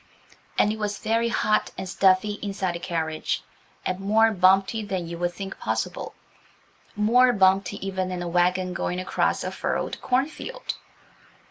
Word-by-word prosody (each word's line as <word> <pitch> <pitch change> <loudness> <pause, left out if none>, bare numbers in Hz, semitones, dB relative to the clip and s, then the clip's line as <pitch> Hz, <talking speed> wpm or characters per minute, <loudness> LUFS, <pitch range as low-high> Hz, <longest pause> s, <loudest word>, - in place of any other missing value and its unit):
And 210 - +4
it 220 - -5
was 205 -1 -2
very 230 +1 +1
hot 215 -1 +1
and 190 - -4
stuffy 195 +2 +3
inside 195 -3 -2
the 170 - -5
carriage, 160 -3 -2 0.4
and 185 0 -1
more 220 +3 +4
bumpety 195 +3 +3
than 190 -5 -3
you 170 0 -6
would 175 0 0
think 195 +1 -7
possible–more 210 - -1
bumpety 195 -1 +3
even 190 -1 -2
than 180 -1 -3
a - - -4
wagon 180 +1 +1
going 180 +1 -2
across 185 - 0
a - - -3
furrowed - - -3
corn 255 +2 +2
field. - - -6
195 Hz, 150 wpm, -25 LUFS, 180-215 Hz, 0.4 s, And